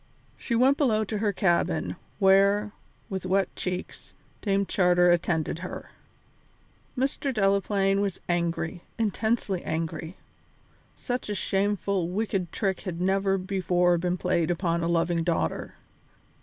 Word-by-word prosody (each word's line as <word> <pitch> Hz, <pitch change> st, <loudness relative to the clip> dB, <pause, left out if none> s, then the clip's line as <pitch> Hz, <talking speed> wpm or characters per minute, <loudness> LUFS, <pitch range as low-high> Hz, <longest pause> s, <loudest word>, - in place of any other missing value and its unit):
She 235 Hz, -, -3 dB
went 260 Hz, +4 st, +4 dB
below 220 Hz, -7 st, +3 dB
to 215 Hz, 0 st, -3 dB
her 210 Hz, -1 st, +1 dB
cabin, 185 Hz, -3 st, +1 dB, 0.2 s
where, 200 Hz, +2 st, +4 dB, 0.4 s
with 190 Hz, -2 st, -4 dB
wet 190 Hz, 0 st, +1 dB
cheeks, 180 Hz, 0 st, -5 dB, 0.3 s
Dame 200 Hz, -1 st, +1 dB
Charter 180 Hz, -2 st, +4 dB
attended 170 Hz, -2 st, 0 dB
her. 185 Hz, -, -7 dB, 1.1 s
Mr. 275 Hz, +1 st, 0 dB
Delaplaine 195 Hz, -2 st, +2 dB
was 200 Hz, -3 st, -2 dB
angry, 170 Hz, -1 st, -1 dB, 0.2 s
intensely 220 Hz, -3 st, 0 dB
angry. 160 Hz, +1 st, -3 dB, 0.8 s
Such 245 Hz, -3 st, -4 dB
a 205 Hz, -, -1 dB
shameful, 195 Hz, -2 st, 0 dB
wicked 190 Hz, -3 st, -2 dB
trick 195 Hz, -3 st, -1 dB
had 180 Hz, -4 st, -5 dB
never 195 Hz, +1 st, +2 dB
before 180 Hz, -2 st, +1 dB
been 180 Hz, +1 st, -1 dB
played 175 Hz, -2 st, 0 dB
upon 170 Hz, -1 st, 0 dB
a 165 Hz, -, 0 dB
loving 170 Hz, 0 st, +1 dB
daughter. 165 Hz, -, -1 dB
190 Hz, 125 wpm, -27 LUFS, 175-205 Hz, 1.1 s, went